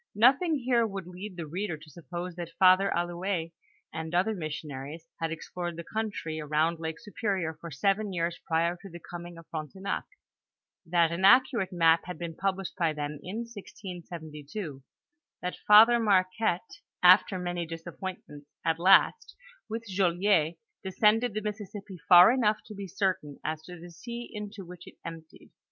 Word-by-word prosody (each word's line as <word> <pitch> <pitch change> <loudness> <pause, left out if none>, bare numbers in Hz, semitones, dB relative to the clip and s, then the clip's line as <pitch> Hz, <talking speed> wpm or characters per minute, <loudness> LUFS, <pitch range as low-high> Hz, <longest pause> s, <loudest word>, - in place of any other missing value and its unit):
Nothing 270 - +5
here 240 -3 +2
would 195 -3 -6
lead 180 +2 -8
the 170 - -4
reader 175 +2 -3
to 155 +1 -15
suppose 175 +1 -6
that 170 -1 -7
Father 185 +1 +6
Allouez 175 0 -2 0.4
and 160 +1 -4
other 190 +5 +2
missionaries 155 -2 -6
had 165 0 -1
explored 175 +1 -5
the 170 - -5
country 205 -7 -3
around 155 +2 +1
Lake 160 0 -4
Superior 200 -7 -2
for 170 - -7
seven 195 +8 0
years 170 -1 -2
prior 170 +1 +1
to 195 - -10
the 170 0 -9
coming 175 0 -9
of 165 - -12
Frontenac; 165 +5 -4 0.8
that 170 -1 +3
an 170 +3 -3
accurate 230 -2 +5
map 165 -2 +4
had 180 0 -6
been 170 -1 -5
published 195 0 -2
by 165 -3 +1
them, 150 0 -4
in 200 +8 -5
1672; 175 -7 -8 0.6
that 180 - -3
Father 225 +3 +8
Marquette, 195 -1 +1 0.3
after 185 +1 +7
many 175 -1 -3
disappointments, 165 -3 -8 0.2
at 165 0 +1
last, 195 - +4 0.3
with 225 +1 -4
Joliet^ 180 -3 +2 0.3
descended 210 +4 +2
the 215 - -1
Mississippi 205 -3 -6
far 180 +3 +10
enough 220 -4 +2
to 215 - -9
be 200 -1 -6
certain 180 -7 -2
as 155 0 -2
to 180 -1 -10
the 175 +1 -11
sea 235 +7 -7
into 210 -2 -7
which 175 0 -12
it - - -12
emptied. 160 -1 -10
180 Hz, 155 wpm, -29 LUFS, 165-205 Hz, 0.8 s, far